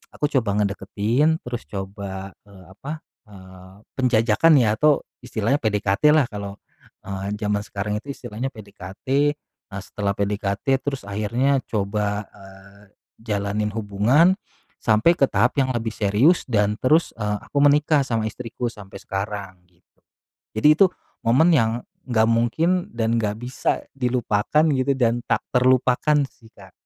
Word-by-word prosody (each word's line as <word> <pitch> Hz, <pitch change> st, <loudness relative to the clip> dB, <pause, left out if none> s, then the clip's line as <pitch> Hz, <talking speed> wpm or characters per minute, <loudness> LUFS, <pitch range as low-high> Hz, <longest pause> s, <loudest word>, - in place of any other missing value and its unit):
aku 150 Hz, 0 st, -1 dB
coba 105 Hz, -4 st, -2 dB
ngedeketin 105 Hz, +10 st, 0 dB
terus 120 Hz, -10 st, -6 dB
coba, 95 Hz, +1 st, -6 dB, 0.2 s
eee, 95 Hz, -2 st, -15 dB
apa, 150 Hz, -, -8 dB, 0.2 s
eee, 95 Hz, -1 st, -14 dB, 0.2 s
penjajakan 125 Hz, +5 st, +4 dB
ya 110 Hz, -5 st, +3 dB
atau 150 Hz, -1 st, +3 dB, 0.2 s
istilahnya 120 Hz, +1 st, 0 dB
PDKT 105 Hz, 0 st, -1 dB
lah 145 Hz, -6 st, +3 dB
kalau, 100 Hz, -1 st, -7 dB, 0.5 s
eee, 100 Hz, 0 st, -4 dB
zaman 105 Hz, -1 st, -1 dB
sekarang 105 Hz, 0 st, -3 dB
itu 140 Hz, -, -6 dB
istilahnya 120 Hz, +2 st, -5 dB
PDKT. 110 Hz, +8 st, -2 dB, 0.4 s
Nah 95 Hz, -, -5 dB
setelah 100 Hz, -1 st, -3 dB
PDKT 100 Hz, +5 st, 0 dB
terus 135 Hz, -5 st, -3 dB
akhirnya 120 Hz, +7 st, 0 dB
coba, 105 Hz, 0 st, -2 dB
eee, 100 Hz, 0 st, -16 dB, 0.4 s
jalanin 105 Hz, 0 st, -2 dB
hubungan, 115 Hz, -, +3 dB, 0.4 s
sampai 115 Hz, +10 st, +3 dB
ke 140 Hz, -, +1 dB
tahap 125 Hz, -, +1 dB
yang 130 Hz, -1 st, +1 dB
lebih 115 Hz, -1 st, -2 dB
serius 110 Hz, -, +3 dB
dan 105 Hz, -3 st, +1 dB
terus, 155 Hz, +6 st, +3 dB
eee, 105 Hz, -2 st, -2 dB
aku 145 Hz, -, -6 dB
menikah 145 Hz, 0 st, +4 dB
sama 115 Hz, -4 st, -1 dB
istriku 120 Hz, +2 st, -5 dB
sampai 100 Hz, -4 st, -10 dB
sekarang 95 Hz, -2 st, -5 dB
gitu. 90 Hz, -1 st, -37 dB, 0.6 s
Jadi 110 Hz, +7 st, +3 dB
itu 195 Hz, -, +8 dB, 0.4 s
momen 145 Hz, +10 st, +4 dB
yang 115 Hz, -5 st, +3 dB, 0.4 s
gak 110 Hz, -2 st, +3 dB
mungkin 160 Hz, +11 st, +1 dB
dan 115 Hz, 0 st, 0 dB
gak 105 Hz, -2 st, -1 dB
bisa 125 Hz, +2 st, -2 dB
dilupakan 125 Hz, +2 st, +1 dB
gitu 130 Hz, +1 st, +1 dB
dan 120 Hz, -2 st, +2 dB
tak -, -, 0 dB
terlupakan 130 Hz, +3 st, +3 dB
sih 115 Hz, -, -21 dB
Kak. -, -, -15 dB
110 Hz, 140 wpm, -22 LUFS, 100-130 Hz, 0.6 s, itu